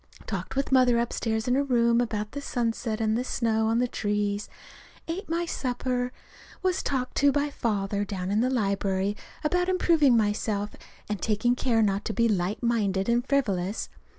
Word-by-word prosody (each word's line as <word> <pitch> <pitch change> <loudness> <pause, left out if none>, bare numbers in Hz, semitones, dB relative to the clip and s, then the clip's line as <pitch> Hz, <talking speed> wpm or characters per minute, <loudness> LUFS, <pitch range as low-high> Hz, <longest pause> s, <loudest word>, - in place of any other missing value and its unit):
Talked 195 0 -4
with 275 0 -1
Mother 255 -2 +5
upstairs 225 -1 -1
in 250 - +3
her 270 - +3
room 235 -3 +3
about 215 -3 -2
the 285 - -5
sunset 230 -3 -2
and 220 -1 +1
the 245 - 0
snow 225 -3 0
on 225 +1 +2
the 250 +1 +2
trees. 205 -2 -1 0.6
Ate 335 +3 -4
my 340 +1 0
supper. 250 -4 -2 0.5
Was 370 0 +1
talked 255 -2 -2
to 285 0 +5
by 290 +1 0
Father 205 -5 -1
down 190 -2 -4
in 210 +2 +2
the 255 - +2
library 200 -4 0 0.3
about 360 +4 +1
improving 325 -8 +4
myself 210 -1 0 0.4
and 210 -3 -3
taking 220 +3 +2
care 240 -3 +2
not 200 -1 +1
to 220 - -2
be 230 +1 +3
light 205 +1 -1
minded 205 -4 +1
and 240 +2 +1
frivolous. 205 -8 0
230 Hz, 175 wpm, -27 LUFS, 205-255 Hz, 0.6 s, Mother